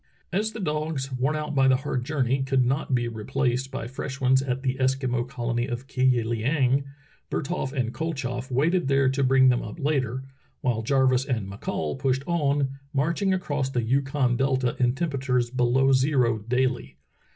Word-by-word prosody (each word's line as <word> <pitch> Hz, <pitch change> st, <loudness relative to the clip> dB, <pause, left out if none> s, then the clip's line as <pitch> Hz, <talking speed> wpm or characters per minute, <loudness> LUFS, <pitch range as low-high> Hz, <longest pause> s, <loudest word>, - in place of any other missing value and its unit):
As 215 Hz, +4 st, 0 dB
the 225 Hz, -, -8 dB
dogs, 150 Hz, -5 st, -2 dB
worn 130 Hz, +4 st, 0 dB
out 150 Hz, -1 st, -3 dB
by 135 Hz, -1 st, +4 dB
the 130 Hz, -, +5 dB
hard 130 Hz, -1 st, -2 dB
journey, 135 Hz, -2 st, 0 dB
could 135 Hz, -1 st, +2 dB
not 135 Hz, +1 st, 0 dB
be 120 Hz, -1 st, 0 dB
replaced 125 Hz, +3 st, -1 dB
by 135 Hz, -1 st, -5 dB
fresh 130 Hz, +2 st, -6 dB
ones 130 Hz, 0 st, +4 dB
at 130 Hz, -1 st, -3 dB
the 130 Hz, -1 st, 0 dB
Eskimo 130 Hz, -2 st, 0 dB
colony 120 Hz, -2 st, -2 dB
of 120 Hz, 0 st, -4 dB
Ki 135 Hz, -1 st, -5 dB
yi 125 Hz, -2 st, +4 dB
Iieng, 130 Hz, +4 st, +1 dB, 0.4 s
Bertholf 150 Hz, -3 st, -2 dB
and 125 Hz, -4 st, -2 dB
KoltchofF 135 Hz, -5 st, -3 dB
waited 155 Hz, +6 st, +1 dB
there 135 Hz, -1 st, +3 dB
to 135 Hz, +1 st, 0 dB
bring 130 Hz, 0 st, +5 dB
them 125 Hz, -1 st, +2 dB
up 105 Hz, -, -8 dB
later, 130 Hz, -4 st, -1 dB, 0.4 s
while 120 Hz, -3 st, 0 dB
Jarvis 130 Hz, +1 st, +2 dB
and 115 Hz, -8 st, -2 dB
McCall 100 Hz, -, -4 dB
pushed 135 Hz, 0 st, 0 dB
on, 140 Hz, -5 st, 0 dB
marching 170 Hz, +8 st, +1 dB
across 150 Hz, -7 st, -1 dB
the 125 Hz, -3 st, -1 dB
Yukon 135 Hz, 0 st, +1 dB
delta 130 Hz, -2 st, +1 dB
in 125 Hz, 0 st, +2 dB
temperatures 135 Hz, -6 st, -1 dB
below 130 Hz, +1 st, +3 dB
zero 130 Hz, -4 st, +2 dB
daily. 120 Hz, -, -1 dB
130 Hz, 175 wpm, -25 LUFS, 125-140 Hz, 0.4 s, the